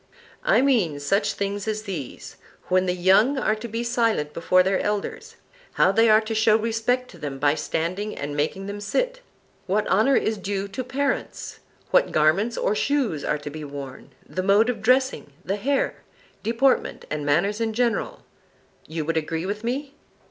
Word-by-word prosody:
I - - +4
mean 205 - +2
such 195 +9 +1
things 200 +1 -3
as 215 0 -2
these:—when 185 - -4
the 180 - +1
young 195 +10 +4
are 215 - +1
to 220 +2 -6
be 230 +1 -3
silent 230 -11 0
before 185 +2 +3
their 190 +1 +1
elders; 210 -1 -3 0.4
how - - +4
they 225 +3 +4
are 215 0 +6
to 220 0 -4
show 220 0 +4
respect 230 +3 -1
to 175 - -14
them 145 -3 -5
by 145 +1 +3
standing 175 +7 -2
and 145 +1 -4
making 155 +6 -1
them 205 +1 -6
sit; - - -1 0.5
what 205 +3 +1
honour 220 +8 +3
is 220 -3 0
due 200 0 -3
to 255 +6 -4
parents; 270 +3 -3 0.3
what - - +4
garments 185 +10 +2
or - - +1
shoes 240 - 0
are 150 - 0
to 145 0 -7
be 155 +1 -7
worn; 140 -2 -8 0.2
the 185 - -3
mode 205 +5 +4
of 220 -4 -8
dressing 255 - +1
the 195 +2 -1
hair; 275 +6 0 0.4
deportment 235 +5 +1
and 150 -1 -2
manners 185 +10 +1
in 225 -1 0
general. 245 - -1 0.6
You 160 -1 -4
would 165 +1 -1
agree 160 +2 -2
with 205 +3 -4
me? 270 +4 -3
205 Hz, 175 wpm, -24 LUFS, 170-230 Hz, 0.6 s, are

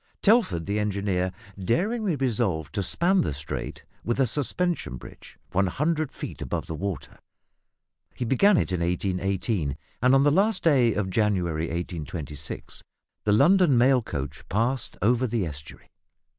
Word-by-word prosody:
Telford, 200 - +3
the 100 +1 -1
engineer, 100 -3 0 0.3
daringly 195 - +1
resolved 105 - -1
to 100 - -1
span 175 - +2
the 75 - -2
strait 70 +1 -6 0.2
with 120 +3 -1
a 135 - +5
suspension 150 - -1
bridge - - -13
100 150 - 0
feet - - -7
above 60 - -3
the - - -6
water. 80 -5 -5 1.0
He 125 - -3
began 185 - +4
it - - 0
in 90 - 0
1818, 90 - -1 0.2
and 130 +2 +5
on 135 - +5
the 145 - +4
last 195 +5 +2
day 130 -9 +4
of 95 -3 -1
January 90 -6 +1
1826 80 -3 -6 0.4
the 105 - +3
London 150 - +5
mail 125 +1 +5
coach 70 - -5
passed 115 +5 -1
over 120 +4 +3
the 110 -4 -1
estuary. 75 -2 -9
105 Hz, 145 wpm, -26 LUFS, 85-135 Hz, 1.0 s, a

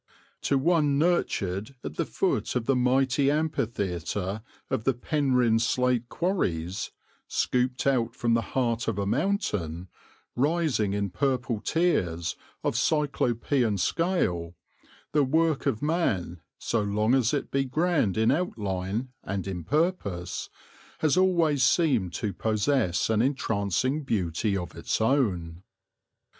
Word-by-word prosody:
To 140 - +2
one 150 -1 +2
nurtured 130 - 0
at - - -5
the - - -2
foot - - -1
of 120 -2 0
the 135 - +2
mighty 130 +2 +2
amphitheatre 105 - -2 0.3
of 110 - 0
the 135 0 +2
Penrhyn 125 -4 +2
Slate 125 0 +1
Quarries, 95 - -1 0.4
scooped 125 0 0
out 120 -4 +1
from 120 -2 +1
the 115 - +3 0.2
heart 115 -3 0
of 115 -3 -1
a 100 - -1
mountain, 105 - -1 0.5
rising 145 - +1
in 100 -2 -1
purple 130 -3 0
tiers 90 - 0 0.3
of - - 0
Cyclopean 125 -6 +1
scale, 90 - 0 0.6
the 150 -1 +3
work 160 +2 +1
of 110 - -1
man, 105 - 0 0.2
so 115 - -1
long 105 +3 +1
as 130 -3 +3
it 145 -2 -2
be 135 0 +2
grand 145 - +1
in 110 +1 +4
outline 105 - -2
and 100 -1 -3
in 90 -3 -4
purpose, 120 - -1 0.5
has 155 -1 +3
always 170 -6 +3
seemed 125 - +3
to 100 +5 -2
possess 110 -4 +1
an 110 -1 +3
entrancing 130 - 0
beauty 100 - -1
of 90 -3 -6
its - - -2
own. 95 -10 0
120 Hz, 125 wpm, -27 LUFS, 100-145 Hz, 0.6 s, in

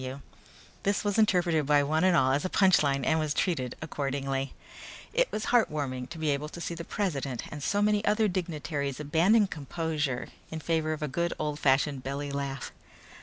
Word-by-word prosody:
F.W." 130 +2 -6 0.6
This 200 +1 0
was 205 +1 +1
interpreted 175 -8 +3
by 145 -1 +5
one 155 +3 +1
and 185 -2 +5
all 130 -1 +4
as 140 +2 +1
a 185 - -1
punch 190 -2 +5
line 140 -2 +1
and 160 0 +3
was 155 -2 -1
treated 130 -10 0
accordingly. 135 -2 -2 0.6
It - - +2
was 215 - -3
heartwarming 140 - +1
to 170 - -8
be 155 -2 0
able 145 +2 -2
to 170 - -9
see 170 - -3
the 170 0 -6
president 145 - -2
and 150 - -6
so 205 +8 +1
many 210 0 +2
other 215 +1 +3
dignitaries 150 -7 -3
abandon 170 +9 +4
composure 150 -5 -3 0.2
in 160 - -5
favor 160 -1 0
of 155 - -5
a - - 0
good 170 +5 -1
old 150 -1 -2
fashioned 135 0 +2
belly 140 +1 -4
laugh. 140 -2 -4
155 Hz, 190 wpm, -29 LUFS, 140-175 Hz, 0.6 s, by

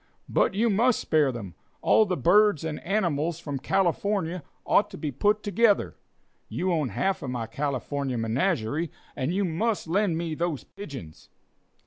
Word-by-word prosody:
"But - - +2
you 225 +4 +2
must 235 +4 +3
spare 150 -4 +2
them. 105 -8 -7 0.3
All 215 - +5
the 185 - -1
birds 185 - +4
and 160 -2 -4
animals 170 -4 0
from 145 -5 -4
California 185 +1 0 0.2
ought 205 - +3
to - - -9
be 150 -3 -3
together. 210 - +2 0.5
You 185 +1 -1
own 155 -6 0
half 190 - -1
of 135 - -4
my 120 -2 -3
California 140 +1 -2
menagerie, 140 - 0 0.3
and 130 +5 -1
you 195 +2 +1
must 190 +4 -1
lend 185 0 +1
me 165 -1 -2
those 165 -2 -2
pigeons." 135 - -10
165 Hz, 150 wpm, -26 LUFS, 140-200 Hz, 0.5 s, All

